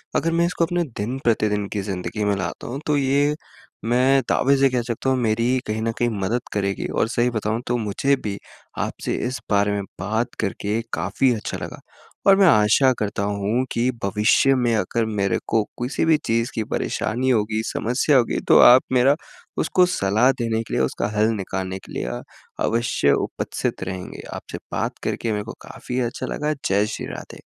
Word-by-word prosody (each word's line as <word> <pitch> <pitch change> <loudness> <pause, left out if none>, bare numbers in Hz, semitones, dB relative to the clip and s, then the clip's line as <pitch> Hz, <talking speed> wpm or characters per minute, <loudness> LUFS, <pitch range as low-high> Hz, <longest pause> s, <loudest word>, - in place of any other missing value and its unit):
अगर 165 - +1
मैं 170 +1 +2
इसको 170 -1 +1
अपने 175 +1 0
दिन-प्रतिदिन 110 -3 0
की 105 - -1
ज़िंदगी 95 +1 -4
में 100 -1 +2
लाता 95 -2 -4
हूँ 130 +3 -4
तो 150 - +2
ये 140 +2 +2 0.5
मैं 130 +3 +3
दावे 140 +2 +3
से 135 0 +4
कह 125 -1 0
सकता 120 +2 -2
हूँ 130 - +2
मेरी 115 -2 +1
ही 130 - +2
कहीं 110 +1 -2
न 115 +1 0
कहीं 120 - +1
मदद 115 +6 0
करेगी 100 -1 -1
और - - 0
सही 120 +1 +1
बताऊँ 110 0 -1
तो 120 - +1
मुझे 115 +6 +1
भी 100 -2 -3 0.4
आपसे - - -2
इस 130 - -4
बारे 100 0 +3
में 100 0 -1 0.2
बात 110 +6 -1
करके 105 +3 -1
काफ़ी 130 -2 +1
अच्छा 110 - -4
लगा। - - -7 0.5
और 195 - +8
मैं 195 - +6
आशा 110 +1 +5
करता 100 -1 -2
हूँ 105 +5 0
कि 120 +2 +1
भविष्य 105 +7 +3
में 120 -3 +1
अगर 110 +3 0
मेरे 100 -3 0
को 110 -1 +2 0.2
किसी 125 +6 0
भी 160 -1 +5
चीज़ 115 +2 0
की 110 - 0
परेशानी 125 +4 -1
होगी, 110 -2 +1
समस्या 125 +5 +1
होगी 120 - +1
तो - - +7
आप 125 +1 +9
मेरा 130 +3 +5 0.5
उसको 180 - +3
सलाह 115 - +2
देने 115 -1 0
के - - -9
लिए - - +2
उसका 65 - -1
हल 105 +1 +4
निकालने 95 -1 -4
के - - -15
लिए - - -3
अ, - - -4 0.4
अवश्य 115 -11 +1 0.2
उपस्थित - - -3
रहेंगे। 95 -1 -6
आपसे - - -7
बात - - -2
करके 115 - -2
मेरे 105 -1 -1
को 115 - -8
काफ़ी 125 +1 -5
अच्छा - - -6
लगा। 150 +1 -1 0.2
जय 100 +2 +3
श्री - - -5
राधे। - - -10
115 Hz, 190 wpm, -22 LUFS, 105-130 Hz, 0.5 s, आप